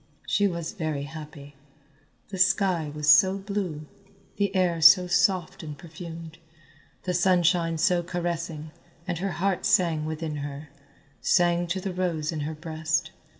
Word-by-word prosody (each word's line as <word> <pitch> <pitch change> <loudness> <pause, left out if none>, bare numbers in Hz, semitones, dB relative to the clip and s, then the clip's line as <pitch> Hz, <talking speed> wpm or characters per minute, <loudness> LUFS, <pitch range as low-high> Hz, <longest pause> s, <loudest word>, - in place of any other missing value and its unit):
She 205 - +2
was 170 -3 -4
very 155 -8 -3
happy. 145 -1 -10 0.8
The 190 -2 -6
sky 185 -4 +2
was 150 0 -5
so 190 +7 +6
blue, 195 -6 -4 0.5
the 200 -1 0
air 175 -3 +1
so 180 +3 +8
soft 180 -1 +1
and 150 -2 -8
perfumed, 165 -1 -10 0.6
the 180 - -2
sunshine 175 -2 +2
so 175 +2 +2
caressing, 170 -3 -4 0.4
and 175 -2 -2
her 195 0 -2
heart 190 0 -1
sang 165 -4 +2
within 155 -1 -4
her, 145 +1 -7 0.5
sang 175 -1 +2
to 180 +3 -2
the 190 0 -4
rose 170 -4 -1
in 160 - -4
her 155 +2 -4
breast. 160 0 -2
170 Hz, 145 wpm, -26 LUFS, 155-180 Hz, 0.8 s, so